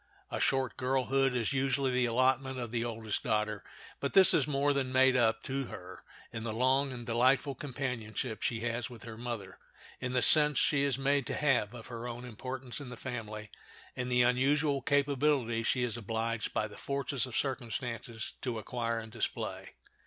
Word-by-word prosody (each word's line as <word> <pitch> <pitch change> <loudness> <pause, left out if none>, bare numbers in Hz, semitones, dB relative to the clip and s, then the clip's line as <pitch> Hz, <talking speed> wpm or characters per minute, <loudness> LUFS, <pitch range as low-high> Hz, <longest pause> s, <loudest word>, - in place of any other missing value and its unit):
A - - -2
short 135 -2 +1
girlhood 135 0 +1
is 120 +2 0
usually 135 0 +1
the 125 -1 +2
allotment 130 +2 +2
of 120 -3 -4
the 120 -1 0
oldest 110 -2 -3
daughter; 105 -3 -1 0.4
but - - -2
this 190 -1 +7
is - - +3
more 145 0 +2
than 135 -2 -1
made 130 0 +5
up 115 -2 +2
to 135 0 -2
her - - -9 0.3
in 115 - -5
the 115 - -2
long 130 +4 +2
and 120 -2 -7
delightful 130 +4 +3
companionship 125 -5 -4
she 115 -2 -1
has 120 +1 -2
with 120 -2 -11
her 115 -1 -7
mother, 115 -5 -6 0.4
in 125 -1 -3
the 125 - +2
sense 150 -3 +7
she 140 -2 +3
is 140 -3 +1
made 140 0 +1
to - - -2
have 125 -6 +1
of 115 - -9
her 120 -1 -6
own 120 +1 -6
importance 130 +3 -6
in 135 - -7
the 125 - -8
family, 110 -4 -6 0.4
and 125 0 -3
the 125 0 +5
unusual 140 +3 +2
capability 140 -4 +2
she 125 +2 +1
is 120 -3 -1
obliged 115 +1 -2
by 110 - 0
the 105 - -12
force 140 -2 -1
of 125 - -4
circumstances 120 -3 -3
to 125 -3 -2
acquire 115 +1 -2
and 110 -1 -6
display. - - -4
125 Hz, 185 wpm, -32 LUFS, 115-135 Hz, 0.4 s, this